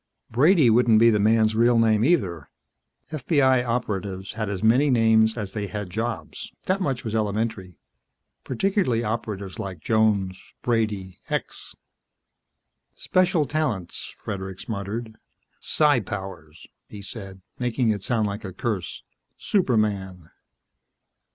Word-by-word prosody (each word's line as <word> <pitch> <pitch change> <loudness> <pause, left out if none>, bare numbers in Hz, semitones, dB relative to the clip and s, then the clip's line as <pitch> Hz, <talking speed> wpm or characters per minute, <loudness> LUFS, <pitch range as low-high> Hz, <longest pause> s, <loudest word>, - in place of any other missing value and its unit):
Brady 145 - +5
wouldn't 115 -1 +5
be 115 +1 +6
the 105 - +2
man's 110 +1 +3
real 120 +2 +4
name, 110 -1 +3
either. 95 - +1 0.6
FBI 135 -4 +2
Operatives 100 -5 -3
had 110 -2 -3
as 100 -1 -4
many 125 +7 +4
names 110 -2 +4
as 105 -4 -4
they 105 -2 -3
had 105 -3 -5
jobs, 115 +3 -4
that 190 +1 0
much 135 -7 -1
was 110 - -4
elementary. 105 -3 -2 0.7
Particularly 130 - 0
operatives 105 -3 -4
like 95 -5 -5
Jones 100 -1 0
Brady 105 -6 -1
X. - - -4 1.2
"Special 180 -4 +2
talents," 130 - -3
Fredericks 95 -2 -6
muttered. 110 +2 -5 0.4
"Psi 150 -4 +3
powers," 95 -6 -7 0.2
he 100 -1 -9
said, 95 -3 -9 0.2
making 125 -1 +1
it 105 -2 -2
sound 110 0 0
like 105 +1 -4
a 95 -2 -6
curse. 95 -2 -4 0.3
"Superman." 100 - 0
110 Hz, 120 wpm, -24 LUFS, 100-120 Hz, 1.2 s, be